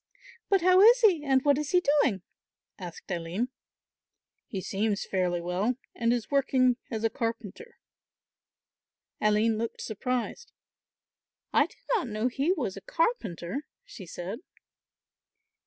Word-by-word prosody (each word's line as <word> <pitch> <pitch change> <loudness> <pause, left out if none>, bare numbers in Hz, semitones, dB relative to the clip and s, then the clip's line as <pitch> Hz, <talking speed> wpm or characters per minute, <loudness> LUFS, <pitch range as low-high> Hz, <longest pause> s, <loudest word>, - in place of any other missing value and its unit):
"But 390 -2 +4
how 370 +2 +6
is 475 +4 +7
he 370 -9 +4
and 265 -2 +2
what 285 -1 +4
is 300 -1 -3
he 360 0 +3 0.2
doing?" 195 -10 0 0.6
asked 180 0 -9
Aline. 175 +8 -2 1.0
"He 195 - -4
seems 200 +2 -1
fairly 180 -2 0
well 180 +8 -1 0.2
and 230 -1 +1
is 240 0 -2
working 255 -3 +3
as 220 -1 -4
a 225 - +3
carpenter." 230 - -5 1.4
Aline 215 +1 +2
looked 230 0 -4
surprised. 250 - -3 1.0
"I - - +4
did - - -22 0.2
not 380 - -1
know 215 +2 -1
he 275 +7 0
was 265 - -2
a - - -8
carpenter," 290 - -2 0.2
she 230 - -11
said. 180 +6 -6
235 Hz, 130 wpm, -28 LUFS, 200-295 Hz, 1.4 s, is